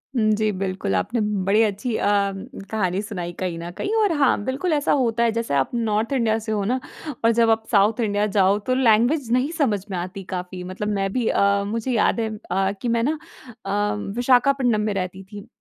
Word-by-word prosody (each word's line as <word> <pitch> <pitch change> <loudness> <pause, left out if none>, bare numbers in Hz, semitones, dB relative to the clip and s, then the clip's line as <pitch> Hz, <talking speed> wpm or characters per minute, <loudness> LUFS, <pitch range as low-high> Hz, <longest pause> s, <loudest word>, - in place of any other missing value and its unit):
हुँ, 215 -3 +3
जी। 215 0 +1
बिल्कुल 195 0 -3
आपने 230 +4 -1 0.3
बड़ी 210 +3 +4
अच्छी 215 +2 -1
अ, - - -1 0.7
कहानी 190 -3 0
सुनाई 180 -5 -5
कहीं 180 -3 -2
न 170 +1 -6
कहीं 415 - -2
और 405 - +2
हाँ 270 -7 +2
बिल्कुल 280 - -1
ऐसा 290 -1 +1
होता 235 -4 +2
है। 230 - +3
जैसे 230 -6 -2
आप 135 -1 +1
नॉर्थ 225 +1 0
इंडिया 230 -4 +2
से 220 0 -5
हो 210 -2 0
ना 250 +5 0 0.5
और 230 - +6
जब 230 0 +3
आप 225 0 +2
साउथ 210 +2 +3
इंडिया 205 -2 +1
जाओ 195 +1 +4
तो - - +4
लैंग्वेज़ 240 +2 +3
नहीं 255 +5 +1
समझ 215 - +1
में 185 - -2
आती 185 +3 -5
काफ़ी 180 0 -5
मतलब 185 +3 -5
मैं 195 0 -1
भी 245 -3 0
अ, 200 0 +2
मुझे 225 +5 -3
याद 230 0 +2
है 225 - -1 0.2
अ, 195 0 +1
कि 245 - -2
मैं 230 0 +1
ना 305 +5 0 0.5
अ, 205 +1 0 0.2
विशाखापट्टनम 245 -2 +3
में 210 -1 -1
रहती 185 0 -4
थी। 205 +2 -11
215 Hz, 210 wpm, -23 LUFS, 195-235 Hz, 0.7 s, और